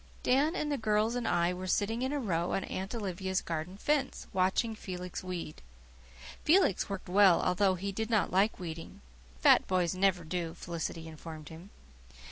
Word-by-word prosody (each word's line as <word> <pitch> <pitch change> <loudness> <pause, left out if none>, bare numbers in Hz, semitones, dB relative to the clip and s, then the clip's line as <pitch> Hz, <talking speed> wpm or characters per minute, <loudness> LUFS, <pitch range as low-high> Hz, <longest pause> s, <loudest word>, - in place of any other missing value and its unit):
Dan 285 +7 +3
and 300 -5 -1
the 285 - -1
girls 215 +1 +1
and 245 -2 -2
I 175 0 +2
were 185 +1 -6
sitting 225 +5 0
in 260 +1 0
a 290 - -1
row 175 -8 -1
on 195 - 0
Aunt 190 +5 -4
Olivia's 190 -3 -2
garden 165 +3 -4
fence, 285 +3 0
watching 190 +5 +1
Felix 180 -4 -6
weed. 180 -4 -6 0.8
Felix 315 - +3
worked 195 -1 -5
well, 190 -1 +6
although 185 +1 +2
he 195 +2 -3
did 220 +3 -3
not 220 -3 +2
like 200 +4 +2
weeding 165 - -7 0.4
"fat - - +6
boys 180 -2 +1
never 185 -2 +2
do," 165 0 -3
Felicity 165 -1 -5
informed 155 -1 -9
him. 165 +4 -11
190 Hz, 170 wpm, -31 LUFS, 175-220 Hz, 0.8 s, well